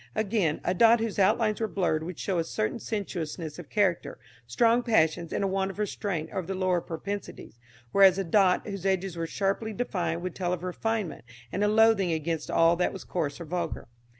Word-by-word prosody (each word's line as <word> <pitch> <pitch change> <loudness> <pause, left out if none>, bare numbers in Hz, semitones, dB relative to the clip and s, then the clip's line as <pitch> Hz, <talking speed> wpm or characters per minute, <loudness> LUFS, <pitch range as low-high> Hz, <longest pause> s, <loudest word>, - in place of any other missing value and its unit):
Again, 205 -7 0
a - - +1
dot 230 +4 +5
whose 225 -2 -2
outlines 215 +3 +2
were 220 - +1
blurred 180 -6 0
would 170 +1 -6
show 190 -3 -1
a - - +1
certain 110 -9 -2
sensuousness 170 -6 -4
of 165 - -10
character 195 -5 0 0.3
strong 230 - +3
passions 170 -8 +1
and - - -1
a - - +2
want 190 0 0
of 195 - -8
restraint 195 -6 -3
over 185 -3 -4
the 190 - -3
lower 185 -2 +1
propensities; 190 - -7 0.3
whereas, 195 +1 +6
a 195 - 0
dot 185 +1 +3
whose 200 -3 -6
edges 190 -2 0
were 165 -1 -3
sharply 200 +4 -1
defined 175 -7 -2
would 180 -1 -3
tell 180 -1 -2
of 180 -1 -4
refinement 200 - -3 0.3
and 200 - -1
a - - +3
loathing 215 -4 +4
against 160 0 -2
all 165 +1 +4
that 180 - 0
was 195 - -8
coarse 150 -5 -3
or 170 - -6
vulgar. 175 -4 -4
185 Hz, 200 wpm, -27 LUFS, 170-205 Hz, 0.3 s, whereas